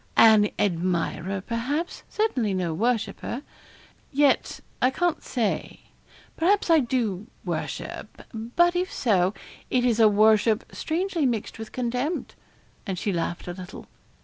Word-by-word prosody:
'An 215 -2 +7
admirer, 185 0 -1
perhaps 255 - -3
certainly 255 - 0
no 175 -3 -1
worshipper. 235 - -1 0.7
Yet, 285 0 +2 0.2
I 255 - +5
can't 345 +5 0
say. 230 -6 -2 0.5
Perhaps 365 +2 +2
I 325 - +7
do 230 -6 -1 0.2
worship; - - -5
but 245 +11 +1
if 365 +1 0
so, 195 -5 +2 0.3
it 250 -1 +2
is 235 -2 +2
a 220 -1 +7
worship 215 +2 +4
strangely 335 -2 -1
mixed 225 -2 -3
with 220 - -7
contempt.' 250 +6 -2 0.5
And 190 -2 -2
she 195 +2 -1
laughed 175 +1 -3
a 175 - -3
little. 185 +1 -9
230 Hz, 125 wpm, -25 LUFS, 200-280 Hz, 0.7 s, An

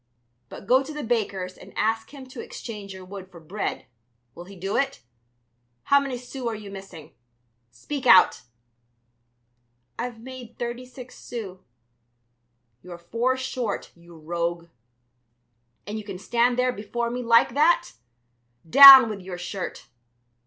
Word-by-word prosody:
But - - -11
go 255 +5 +4
to 275 - -8
the 300 -1 -6
baker's 200 -6 -3
and - - -14
ask 225 +1 -1
him 275 -2 -11
to 255 -2 -8
exchange 210 -4 -9
your 190 -1 -10
wood 190 0 -10
for 175 - -14
bread, 180 +6 -5 0.5
will 175 - -11
he 195 +2 -13
do 195 +2 -4
it? 275 0 -1 0.8
How 280 - +4
many 275 -3 -4
sous 250 0 -7
are 230 - -2
you 210 -2 -10
missing? 195 -5 -11 0.6
Speak 250 - -6
out!" 185 -5 +6 1.6
"I've 240 -1 -5
made 250 -1 -11
thirty 240 +1 -5
six 255 0 -13
sous." 200 -6 -8 1.2
"You're 180 -1 -10
four 230 +9 -1
short, 255 -4 -4
you 170 0 -17
rogue. 170 +1 -4 1.2
And 210 +2 -5
you - - -8
can 200 -3 -8
stand 240 +5 0
there 250 0 +1
before 235 +3 -4
me 250 +1 -4
like 230 0 +3
that! 310 - +3 0.8
Down 270 - +11
with 210 -3 -6
your 180 -1 -8
shirt! 180 +1 -6
225 Hz, 145 wpm, -24 LUFS, 185-250 Hz, 1.6 s, Down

